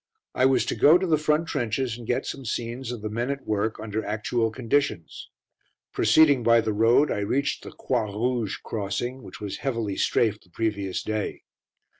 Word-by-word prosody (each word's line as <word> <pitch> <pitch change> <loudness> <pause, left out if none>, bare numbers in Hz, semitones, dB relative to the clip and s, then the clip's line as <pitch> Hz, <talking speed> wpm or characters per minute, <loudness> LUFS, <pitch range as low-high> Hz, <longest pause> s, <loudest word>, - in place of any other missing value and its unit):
I 130 - +4
was 135 - +2
to - - -1
go 155 +4 +6
to 185 - -2
the 160 -4 +2
front 155 +2 +1
trenches 120 -3 -1
and 120 -2 -10
get 125 - 0
some 135 - -5
scenes 120 +2 -4
of 120 -3 -7
the 110 - -2
men 120 +4 -2
at 140 0 -4
work 110 +1 -1
under 110 0 -3
actual 110 +2 -1
conditions. 115 - -2 0.6
Proceeding 145 -5 +5
by 115 0 +5
the 110 -1 -1
Road, 115 +7 +4
I - - -1
reached 130 +8 -1
the - - -8
Croix 115 -5 -2
Rouge 115 0 -1
crossing, 115 +5 -3
which 105 - -11
was 105 -2 -5
heavily 115 -7 -2
"strafed" 110 -3 +1
the 90 - -25
previous 100 -1 -2
day. 110 -1 -3
115 Hz, 185 wpm, -25 LUFS, 105-130 Hz, 0.6 s, go